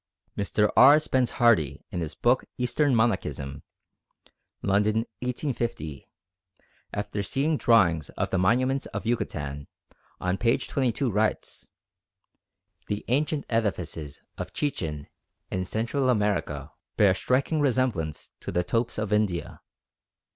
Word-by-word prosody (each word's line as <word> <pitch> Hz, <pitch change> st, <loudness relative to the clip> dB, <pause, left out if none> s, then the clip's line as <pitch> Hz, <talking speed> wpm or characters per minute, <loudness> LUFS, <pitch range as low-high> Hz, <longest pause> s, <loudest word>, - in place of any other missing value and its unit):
Mr. 105 Hz, +1 st, +1 dB
R. 140 Hz, +4 st, +9 dB
Spence 130 Hz, -5 st, +1 dB
Hardy 110 Hz, -, +3 dB
in 90 Hz, -, -3 dB
his 80 Hz, -1 st, -4 dB
book 120 Hz, +8 st, +2 dB
Eastern 130 Hz, +2 st, +1 dB
Monachism 95 Hz, -11 st, 0 dB, 1.0 s
(London, 105 Hz, +3 st, +2 dB
1850), 120 Hz, -, -3 dB, 0.8 s
after 105 Hz, 0 st, -3 dB
seeing 140 Hz, +9 st, 0 dB
drawings 90 Hz, -, +3 dB
of -, -, -1 dB
the 95 Hz, -, +1 dB
monuments 130 Hz, +8 st, +2 dB
of -, -, -6 dB
Yucatan, 75 Hz, -11 st, -2 dB, 0.5 s
on 90 Hz, +1 st, -1 dB
p. 115 Hz, -1 st, +3 dB
22 130 Hz, -1 st, -1 dB
writes, 105 Hz, +2 st, -1 dB, 1.2 s
"The 105 Hz, 0 st, -3 dB
ancient 145 Hz, +3 st, +1 dB
edifices 90 Hz, -10 st, -2 dB, 0.2 s
of -, -, -5 dB
Chichen 80 Hz, -, -2 dB, 0.5 s
in 95 Hz, -1 st, -2 dB
Central 120 Hz, +6 st, 0 dB
America 105 Hz, -4 st, 0 dB, 0.3 s
bear 100 Hz, -2 st, +6 dB
a -, -, +3 dB
striking 135 Hz, +8 st, +1 dB
resemblance 125 Hz, -, 0 dB
to -, -, -6 dB
the 90 Hz, -, +1 dB
topes 115 Hz, +6 st, -1 dB
of 105 Hz, -1 st, -1 dB
India. 105 Hz, -5 st, -1 dB
110 Hz, 120 wpm, -27 LUFS, 90-125 Hz, 1.2 s, R